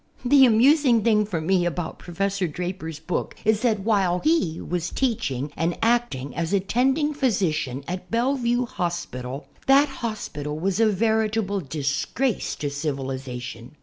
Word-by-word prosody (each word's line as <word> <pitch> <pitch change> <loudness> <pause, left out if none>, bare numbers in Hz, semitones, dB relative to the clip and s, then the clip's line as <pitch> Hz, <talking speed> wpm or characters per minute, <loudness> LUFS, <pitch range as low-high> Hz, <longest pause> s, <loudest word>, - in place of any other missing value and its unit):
The 270 +1 +7
amusing 245 0 +4
thing 210 -2 +3
for 180 -6 -2
me 180 +3 +2
about 175 -1 -3
Professor 195 +2 -2
Draper's 165 -1 -5
hook 180 - -2
is 215 0 +3
that 220 -5 +1
while 190 -4 +2
he 300 - +1
was 175 -1 -3
teach 250 - 0
ing 135 +3 -4
and 170 +1 -1
acting 225 - 0
as 170 +2 -2
attending 265 +10 +1
physician 175 - 0
at 180 +1 -5
Bellevue 245 0 +1
Hos 175 -5 -3
pital 125 +3 -7 0.2
that 280 +2 +6
hospital 150 - -4
was 190 +5 -1
a 225 - +5
veritable 220 -1 +1
disgrace 150 - -1
to 145 -1 -3
civilization. 130 -4 -5
190 Hz, 145 wpm, -24 LUFS, 155-230 Hz, 0.2 s, The